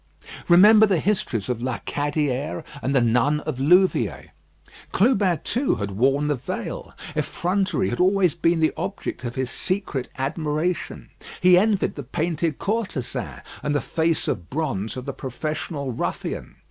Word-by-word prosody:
Remember 210 +5 +7
the 190 -5 +2
histories 150 - -1
of 125 -2 -2
La 130 0 -1
Cadière 145 +1 -2 0.2
and 135 +2 -1
the 130 - +5
nun 125 +6 +2
of 130 - -4
Louviers. 180 +7 +3 0.6
Clubin, 200 -7 +2
too, 255 - 0
had 100 -2 -4
worn 135 +8 +2
the 150 - +2
veil. 125 -2 -5 0.2
Effrontery 190 +1 0
had - - -3
always 185 -2 +3
been 165 0 +1
the 155 - +3
object 195 -8 -4
of 120 -1 -4
his 130 -1 -2
secret 185 -9 -2
admiration. 155 +5 -2 0.3
He 180 0 +6
envied 205 +1 +2
the 145 - -6
painted 155 +3 -2
courtesan, 195 - -3 0.2
and 145 0 -1
the - - +3
face 160 +1 0
of 85 0 -3
bronze 120 -8 -2
of 130 - -6
the 140 - -4
professional 140 +1 -4
ruffian. 115 - -4
155 Hz, 145 wpm, -23 LUFS, 130-185 Hz, 0.6 s, Remember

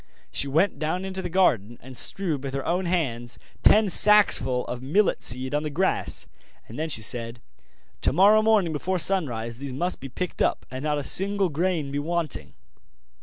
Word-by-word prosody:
She 140 - -3
went 165 +8 +1
down 170 +5 -2
into 190 0 -5
the 180 - -5
garden 120 - +1
and 130 0 -12
strewed 155 0 +2
with 135 -1 -5
her 135 - -4
own 180 +2 -1
hands 120 -9 -2 0.2
ten 215 +1 +5
sacksful 180 - +4
of 125 0 -6
millet 175 +11 +1
seed 130 +3 -2
on 150 - +1
the 155 - -4
grass; 180 +6 -1 0.4
then 155 +8 -5
she 110 -7 -1
said: 115 +2 -2 0.6
'Tomorrow 200 +7 +4
morning 215 -7 +2
before 185 +5 -2
sunrise 125 -11 -1
these 140 -2 -6
must 175 +7 -2
be 135 - -8
picked 180 +8 -5
up, - - 0
and 130 0 -6
not 150 0 -1
a 145 - -3
single 195 +3 +2
grain 160 -2 -2
be 140 - -2
wanting. 150 - -3
155 Hz, 175 wpm, -24 LUFS, 130-185 Hz, 0.6 s, ten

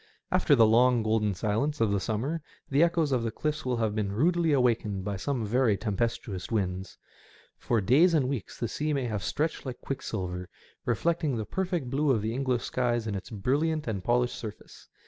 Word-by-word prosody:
After - - +4
the 115 - +6
long 120 +1 +4
golden 110 -2 +1
silence 115 +10 -1
of 110 -3 +2
the 100 - +1
summer 125 - -2 0.3
the 140 +2 +2
echoes 165 -3 +3
of 125 -3 +2
the 115 - -1
cliffs 150 +7 -3
will 125 -1 -1
have 110 -2 0
been 105 -2 -1
rudely 165 - +2
awakened 115 -7 +1
by 100 -1 -2
some 115 +4 -2
very 115 -1 +2
tempestuous 105 -3 -2
winds. 95 -4 -2 0.6
For 115 -3 +1
days 150 - +5
and 140 -5 +2
weeks 130 -7 -4
the 120 - -1
sea 150 +6 -2
may 135 -3 0
have 110 -4 -2
stretched 155 +3 -1
like 130 -3 -6
quicksilver, 90 -9 -4 0.4
reflecting 150 +3 0
the 110 - -3
perfect 175 - -2
blue 145 +2 +1
of 115 -6 +2
the 110 +1 -1
English 130 -2 0
skies 120 -2 0
in 110 - -2
its 95 - -5
brilliant 145 +9 0
and 100 -5 -3
polished 120 +2 +2
surface. 110 -3 -9
120 Hz, 190 wpm, -28 LUFS, 105-140 Hz, 0.6 s, the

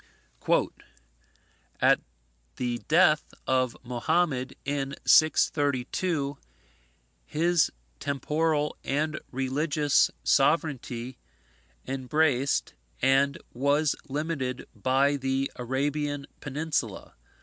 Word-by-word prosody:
"At - - +5 0.6
the 120 -1 -2
death 155 -2 +3
of 130 -2 +1
Mohammad, 130 +2 0
in 140 0 -2
632, 145 0 +2 0.8
his 170 - +2 0.3
temporal 150 +2 0
and 155 +3 -1
religious 145 +3 +2
sovereignty 130 -5 +1 0.7
embraced 135 +1 +1 0.3
and 135 +2 +3 0.2
was 140 +4 +2
limited 140 -3 -3
by 135 +6 +2
the 135 0 -1
Arabian 145 +3 -2
Peninsula. 145 -7 -3
140 Hz, 70 wpm, -27 LUFS, 130-150 Hz, 0.8 s, At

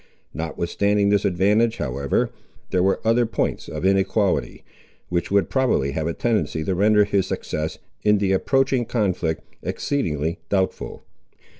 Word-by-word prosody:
Notwithstanding 100 +5 0
this 100 0 +2
advantage, 105 +5 +2
however, 70 -1 -1 0.4
there 90 - +2
were 95 +1 +2
other 115 +1 +3
points 110 - -2
of 75 +3 -4
inequality, 95 +1 +1 0.5
which 85 -1 -1
would 100 -3 +2
probably 130 - +1
have 80 +2 -2
a 85 - -1
tendency 80 -10 0
to 95 - -1
render 105 +3 +4
his 100 -2 0
success, 80 +1 -3 0.2
in 105 0 +4
the 100 -1 +1
approaching 135 +5 +2
conflict, 90 -9 -1 0.2
exceedingly 80 - -2
doubtful. 95 -2 -1
95 Hz, 135 wpm, -23 LUFS, 85-105 Hz, 0.5 s, render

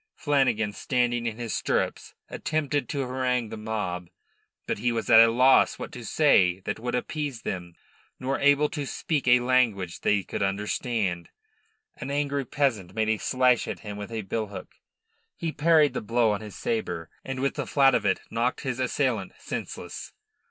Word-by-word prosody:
Flanagan, 125 -8 +1
standing 120 0 0
in 110 -1 -4
his 120 -2 -4
stirrups, - - -1
attempted 145 -2 -2
to 140 - -2
harangue 125 -2 -1
the - - -6
mob. 105 -5 -4 0.6
But - - -2
he 120 +3 +1
was 115 0 -2
at 110 - +10
a 115 0 +8
loss 130 +3 +4
what - - -7
to - - -8
say 90 0 +3
that 105 +3 -4
would 120 +2 -2
appease 140 -2 -3
them, 85 -2 -5 0.4
nor 135 +1 -1
able 145 +1 +4
to 145 -4 -4
speak 145 -2 -2
a 120 0 +6
language 115 -8 +1
they 105 -2 +2
could - - -5
understand. 100 -2 -1 0.7
An 130 - -6
angry 140 -1 -1
peasant 115 -10 -1
made 110 -1 +1
a 110 -1 +1
slash 125 -2 +2
at - - -5
him 105 -1 -6
with 105 +2 -7
a 110 -2 -3
billhook. 100 -1 -5 0.7
He 165 - -2
parried 155 -3 +4
the - - -3
blow 115 0 +2
on 105 0 -2
his 105 -2 -9
sabre, 220 - -3
and 135 -1 -5
with 140 +1 0
the - - -4
flat 135 -2 +4
of 115 - +2
it 100 -2 +1
knocked 120 +2 0
his 130 -3 -3
assailant 125 -6 0
senseless. - - -6
120 Hz, 175 wpm, -26 LUFS, 105-135 Hz, 0.7 s, at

